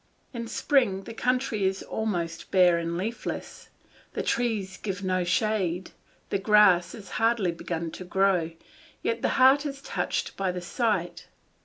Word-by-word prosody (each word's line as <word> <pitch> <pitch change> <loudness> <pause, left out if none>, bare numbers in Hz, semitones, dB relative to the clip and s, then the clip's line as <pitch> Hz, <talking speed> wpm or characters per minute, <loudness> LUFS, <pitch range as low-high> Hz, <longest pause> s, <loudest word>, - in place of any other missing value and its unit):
In 230 -1 -5
spring 225 -7 +1
the 230 - -8
country 250 -3 0
is 190 0 0
almost 175 -7 -3
bare 180 -2 +5
and 170 0 -3
leafless, 220 +6 -5 0.4
the - - -2
trees 220 -6 -1
give 200 -1 -4
no 185 -1 +1
shade, 190 -2 0 0.4
the 200 - +1
grass 195 -4 +5
has 205 -4 -11
hardly 225 -5 +2
begun 165 -1 -4
to 185 - -8
grow, 185 -2 +2 0.5
yet 230 0 -1
the - - +1
heart 265 +2 +6
is 280 -2 -5
touched - - -3
by 190 -1 -1
the 180 - -4
sight. 175 -3 -1
195 Hz, 150 wpm, -27 LUFS, 180-230 Hz, 0.5 s, heart